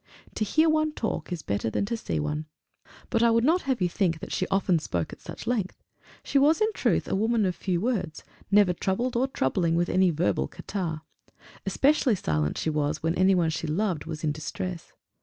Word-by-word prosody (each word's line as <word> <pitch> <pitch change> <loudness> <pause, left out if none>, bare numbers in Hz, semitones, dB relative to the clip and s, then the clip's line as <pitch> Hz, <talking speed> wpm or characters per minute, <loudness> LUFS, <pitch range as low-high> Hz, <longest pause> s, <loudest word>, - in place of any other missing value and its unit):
To - - -1
hear 315 +10 +3
one 310 -1 +2
talk 220 -6 -3
is 175 -3 -4
better 100 +2 -1
than 200 - -1
to 235 - -2
see 225 - -3
one. 150 +1 -3 0.6
But 230 - +2
I 235 - +5
would 230 0 +3
not 335 +7 +3
have 255 -6 0
you - - +3
think 175 -2 0
she 185 - -1
often 190 -3 +2
spoke 85 - -3
at - - -12
such - - -9
length. 225 -6 -2 0.4
She 280 - +2
was 300 +6 +4
in 435 0 +2
truth - - +1
a - - -2
woman 220 +2 +2
of 180 -1 0
few 180 -3 -1
words, 210 -7 -2 0.3
never 200 -3 +5
troubled 235 +8 -1
or 255 +3 +2
troubling 165 - 0
with 175 +1 +1
any 185 0 +4
verbal 100 - 0
catarrh. 165 - -4 0.7
Especially 265 +3 +3
silent 75 - -1
she 160 - -1
was 150 0 -1
when 165 0 +1
any 185 +2 +4
one 165 -3 +2
she 160 - -3
loved 175 -1 -1
was 155 0 -6
in 155 - +1
distress. 165 +3 -5
185 Hz, 205 wpm, -27 LUFS, 160-230 Hz, 0.7 s, I